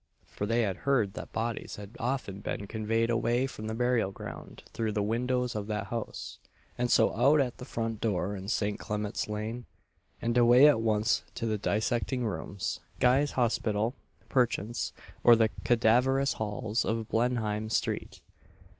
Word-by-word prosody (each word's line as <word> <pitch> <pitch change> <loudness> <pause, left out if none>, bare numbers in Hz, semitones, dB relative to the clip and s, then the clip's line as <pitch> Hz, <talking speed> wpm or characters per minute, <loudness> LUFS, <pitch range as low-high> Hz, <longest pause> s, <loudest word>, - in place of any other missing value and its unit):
For 105 - -5
they 115 +2 +2
had 95 -4 -1
heard 120 -8 +1
that - - -8
bodies 115 0 -3
had 105 +2 -10
often 120 -6 -2
been 100 0 -4
conveyed 115 +2 0
away 120 +2 +1
from 110 -5 -6
the 110 - -3
burial 120 -4 +1
ground - - -9
through 110 -2 -1
the 105 -1 0
windows 125 +3 0
of 105 -1 -3
that 105 -2 -2
house, 115 -2 -5 0.4
and 125 0 -1
so - - +4
out 140 +7 +5
at 125 -4 -1
the 125 - -7
front 115 -4 -3
door 100 -2 0
in 95 0 -7
St. 105 -2 -1
Clement's 105 0 -3
lane, 110 +3 -4 0.5
and 115 0 -1
away 120 +4 +8
at 145 -7 +4
once 110 0 +2
to 115 - -3
the 110 -2 -1
dissecting 115 +4 0
rooms 100 -2 -3 0.2
Guy's 135 +4 +3
Hospital, 115 -2 +1 0.3
perchance, 120 -3 0 0.3
or 120 - +8
the 110 -1 +3
cadaverous 125 +4 +3
halls 110 +1 -2
of 110 -1 -2
Blenheim 110 -3 0
street. - - -2
115 Hz, 160 wpm, -29 LUFS, 105-120 Hz, 0.5 s, away